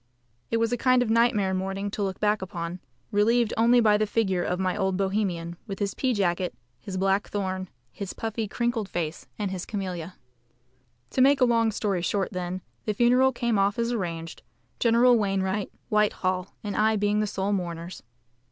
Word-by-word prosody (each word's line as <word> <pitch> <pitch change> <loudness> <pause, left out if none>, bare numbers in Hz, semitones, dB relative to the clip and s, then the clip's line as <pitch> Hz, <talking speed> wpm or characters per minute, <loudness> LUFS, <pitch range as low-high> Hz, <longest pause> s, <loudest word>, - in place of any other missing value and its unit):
It 230 - +1
was 230 0 +1
a - - +1
kind 255 -1 +4
of 220 - -2
nightmare 225 -5 +3
morning 195 +2 -2
to 210 - -4
look 190 -2 -2
back 210 0 +2
upon, 180 -2 -5 0.3
relieved 225 +2 +3
only 235 +2 +5
by 210 -3 +5
the 215 0 0
figure 195 -4 +1
of 180 +1 -1
my 185 -1 0
old 190 -2 0
Bohemian, 190 -4 -1
with 195 -2 -5
his 200 -1 -1
pea 260 - 0
jacket, 180 -2 0 0.2
his 185 +8 -6
black 195 +2 +1
thorn, 190 -2 -3 0.2
his 200 -2 -6
puffy, 225 -1 -3
crinkly 235 0 -1
face, 170 -4 -4
and 205 -3 -2
his 185 -2 -4
camelia. 185 -4 -5 1.0
To 260 - +1
make 275 +2 +5
a 255 - +6
long 230 -2 +3
story 200 -3 -1
short, 195 +2 -1
then, 180 0 -4 0.2
the 215 - -1
funeral 250 +3 +4
came 235 -4 0
off 200 +1 +2
as 235 0 0
arranged, 170 -7 -4 0.4
General 240 +1 +5
Wainwright, 195 -1 0 0.2
Whitehall, 185 -3 0
and 205 -1 -3
I 220 +1 +3
being 205 0 +1
the 215 - +1
sole 200 0 -1
mourners. 170 -2 -4
200 Hz, 180 wpm, -26 LUFS, 185-225 Hz, 1.0 s, a